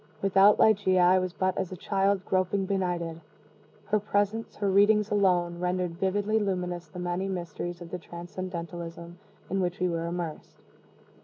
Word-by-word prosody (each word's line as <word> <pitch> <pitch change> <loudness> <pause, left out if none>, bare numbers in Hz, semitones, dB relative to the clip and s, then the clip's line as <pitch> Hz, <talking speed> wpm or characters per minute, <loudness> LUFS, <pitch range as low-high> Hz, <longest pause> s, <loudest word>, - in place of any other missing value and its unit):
Without 195 +1 +5
Ligeia 195 -4 +4
I 180 +1 +5
was 185 -1 -2
but 185 +1 -1
as 190 -2 -3
a 185 - -6
child 195 +1 0
groping 185 +1 +1
benighted. 175 -4 -2 0.6
Her 210 +1 +1
presence, 205 +2 -1
her 205 - -1
readings 205 +2 +4
alone, 180 -4 +2
rendered 180 -1 -2
vividly 205 +3 +1
luminous 180 -3 -2
the 180 - -12
many 180 +2 -2
mysteries 175 -1 -5
of 170 -1 -9
the 180 - -4
transcendentalism 170 -1 -7 0.3
in 195 - -1
which 180 -1 -2
we 180 - +2
were 170 -1 -2
immersed. 170 -2 -5
185 Hz, 155 wpm, -28 LUFS, 175-195 Hz, 0.6 s, Without